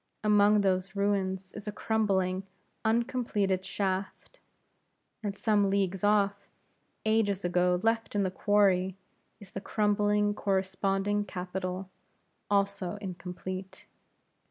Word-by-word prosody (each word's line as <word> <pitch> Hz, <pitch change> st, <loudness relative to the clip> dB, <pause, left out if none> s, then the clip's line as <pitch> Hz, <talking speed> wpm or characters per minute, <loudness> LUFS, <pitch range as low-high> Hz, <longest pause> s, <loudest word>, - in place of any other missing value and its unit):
Among 210 Hz, 0 st, +5 dB
those 190 Hz, 0 st, 0 dB
ruins 190 Hz, -2 st, 0 dB
is 210 Hz, 0 st, -9 dB
a -, -, -1 dB
crumbling, 195 Hz, -4 st, 0 dB, 0.4 s
uncompleted 220 Hz, -5 st, +1 dB
shaft, 195 Hz, -, -3 dB, 0.8 s
and 200 Hz, -2 st, -4 dB
some 205 Hz, -2 st, +2 dB
leagues 195 Hz, -1 st, 0 dB
off, 200 Hz, -1 st, +2 dB, 0.6 s
ages 205 Hz, -3 st, +1 dB
ago 180 Hz, 0 st, +2 dB
left 225 Hz, -1 st, 0 dB
in 200 Hz, -, +2 dB
the 185 Hz, -, 0 dB
quarry, 190 Hz, -2 st, +2 dB, 0.4 s
is 205 Hz, -3 st, -13 dB
the 195 Hz, -, -5 dB
crumbling 205 Hz, 0 st, +2 dB
corresponding 195 Hz, +1 st, 0 dB
capital, 185 Hz, 0 st, -4 dB, 0.6 s
also 200 Hz, -2 st, 0 dB
incomplete. 185 Hz, -1 st, -7 dB
200 Hz, 105 wpm, -29 LUFS, 190-210 Hz, 0.8 s, Among